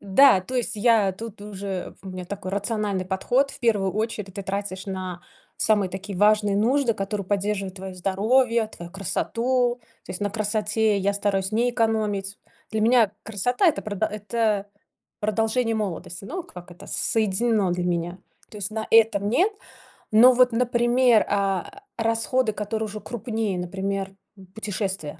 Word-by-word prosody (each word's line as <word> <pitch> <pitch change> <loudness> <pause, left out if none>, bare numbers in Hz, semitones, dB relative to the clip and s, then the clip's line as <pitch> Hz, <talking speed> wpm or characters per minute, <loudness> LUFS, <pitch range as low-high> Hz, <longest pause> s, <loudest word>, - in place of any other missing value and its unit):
да, 200 +1 +6
то 220 +8 -8
есть 240 -2 -1
я 210 -3 +3
тут 220 +1 -9
уже 195 -2 -5
у 190 - -8
меня 185 -1 -6
такой 190 0 -6
рациональный 205 -1 -1
подход. 245 +9 +1
В - - -12
первую 205 -5 +2
очередь, 210 -3 -3
ты 200 - -5
тратишь 195 0 -4
на 185 -2 -5 0.3
самые 205 -3 +2
такие 190 +1 -6
важные 210 -1 +4
нужды, 245 +3 +2
которые 200 0 -3
поддерживают 200 -1 -1
твое 190 0 -7
здоровье, 220 +6 +2
твою 175 -5 -10
красоту, 240 +6 0 0.2
то - - -11
есть 180 - -5
на 205 - 0
красоте 215 0 +1
я 200 +1 +1
стараюсь 200 -1 -1
не 240 +3 +2
экономить. 215 -4 -1 0.3
Для 220 -1 -1
меня 225 -2 +4
красота 225 - 0
это 325 - +3
продо 210 0 -1
это 210 -1 -1 0.5
продолжение 225 +2 +1
молодости, 195 -3 -4
ну 350 - -5
как 180 - -12
это 175 - -13
соединено 215 -2 +1
для 175 0 -2
меня. 175 +1 -2 0.3
То 210 - -9
есть 195 +1 -3
на 220 0 -4
этом- 220 -3 +4
нет. 385 - +3 0.6
Но 240 +4 +8
вот, 250 0 +5
например, 240 0 +3
а, 200 - -1 0.2
расходы, 225 +1 +1
которые 215 +1 -3
уже 215 0 -7
крупнее, 225 -5 -3
например, 195 +2 -3 0.2
м, 190 - -13
путешествия. 195 -7 -4
210 Hz, 155 wpm, -24 LUFS, 195-230 Hz, 0.6 s, Но